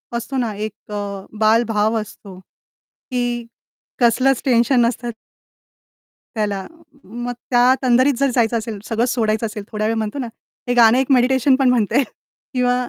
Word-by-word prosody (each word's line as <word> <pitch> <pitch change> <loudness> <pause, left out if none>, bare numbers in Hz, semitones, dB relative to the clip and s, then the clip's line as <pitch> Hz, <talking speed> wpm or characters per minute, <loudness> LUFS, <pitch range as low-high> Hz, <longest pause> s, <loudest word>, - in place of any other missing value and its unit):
असतो 250 +3 -4
ना, 230 -4 -1
एक 215 0 -7
अ, 210 - -4 0.4
बालभाव 220 0 +2
असतो 195 -2 -12
की 245 +4 -6 0.6
कसलंच 255 +2 +3
टेन्शन 245 -1 +3
नसतं 240 0 -3 1.3
त्याला 205 -3 -2 0.4
मग 240 +1 -6 0.2
त्या 245 +1 +5
तंदरीत 255 +2 +4
जर 275 -1 +2
जायचं 230 -1 +2
असेल, 220 -2 -5
सगळं 230 +1 0
सोडायचं 225 -2 0
असेल, 210 -1 -5
थोड्यावेळ 215 +1 -1
म्हणतो 220 +5 -3
ना, 245 - -3 0.4
हे 245 - +1
गाणं 235 0 +6
एक 265 +1 0
मेडिटेशन 260 +1 +4
पण 265 -1 +2
म्हणता 235 -2 +1
येईल. 275 - +3 0.5
किंवा 250 -1 +2
235 Hz, 145 wpm, -20 LUFS, 220-250 Hz, 1.3 s, गाणं